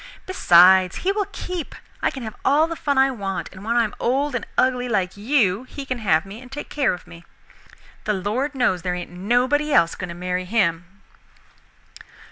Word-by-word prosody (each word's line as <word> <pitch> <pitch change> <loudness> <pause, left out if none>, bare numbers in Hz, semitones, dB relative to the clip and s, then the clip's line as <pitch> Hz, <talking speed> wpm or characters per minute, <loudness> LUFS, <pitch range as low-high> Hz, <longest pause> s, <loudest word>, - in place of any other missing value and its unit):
Besides 185 - +5
he 390 - +3
will 405 -1 -1
keep. 360 -6 -6 0.3
I - - +2
can 265 - -7
have 220 -1 -6
all 295 +3 +4
the 330 0 -5
fun 285 -3 -1
I 270 0 +4
want, 195 -6 -4
and 190 0 -12
when 230 +2 -1
I 240 - +4
am 215 - -4
old 275 +4 0
and 240 - -3
ugly 250 -1 +1
like 190 -5 0
you 210 -3 +1
he 275 +2 -8
can 255 -2 -3
have 190 -6 +2
me 205 +4 -10
and 255 0 -14
take 290 +2 -7
care 285 -3 +1
of 175 - -15
me. 170 0 -13 0.8
The 210 - +1
Lord 225 +10 -2
knows 240 -9 +1
there 180 +1 -2
ain't 175 0 -7
nobody 245 +11 +1
else 170 -10 +4
going 180 - -6
to 170 - -7
marry 180 +1 -3
him." 180 -5 +1
230 Hz, 200 wpm, -22 LUFS, 185-270 Hz, 0.8 s, Besides